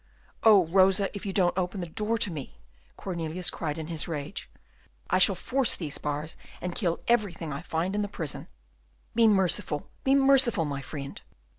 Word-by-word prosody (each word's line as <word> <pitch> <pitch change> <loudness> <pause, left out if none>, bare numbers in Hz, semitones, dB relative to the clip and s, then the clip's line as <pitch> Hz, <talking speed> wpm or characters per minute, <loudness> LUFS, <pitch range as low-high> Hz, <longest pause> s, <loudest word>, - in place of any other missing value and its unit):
"Oh, 210 -5 +7
Rosa, 190 +3 +3
if 200 - -5
you - - -1
don't 180 -2 +2
open 185 +1 -2
the 175 - -3
door 215 +7 -1
to 210 -4 +1
me," 145 -5 -7 0.4
Cornelius 170 -1 -2
cried 150 -2 -3
in 160 - -4
his 165 -1 -2
rage, 155 +1 -5 0.6
"I - - +4
shall - - +6
force 265 -2 0
these 155 -5 -5
bars, 150 +2 -3 0.2
and 180 0 -4
kill 175 -4 -1
everything 190 -10 0
I 140 - -5
find 170 +4 -2
in 210 - 0
the 205 - -1
prison." 200 - -5 0.7
"Be 230 -1 +5
merciful, 180 -7 +1
be 270 +1 +4
merciful, 270 - +4
my 140 -2 -3
friend!" 140 0 -7
180 Hz, 175 wpm, -28 LUFS, 160-205 Hz, 0.7 s, Oh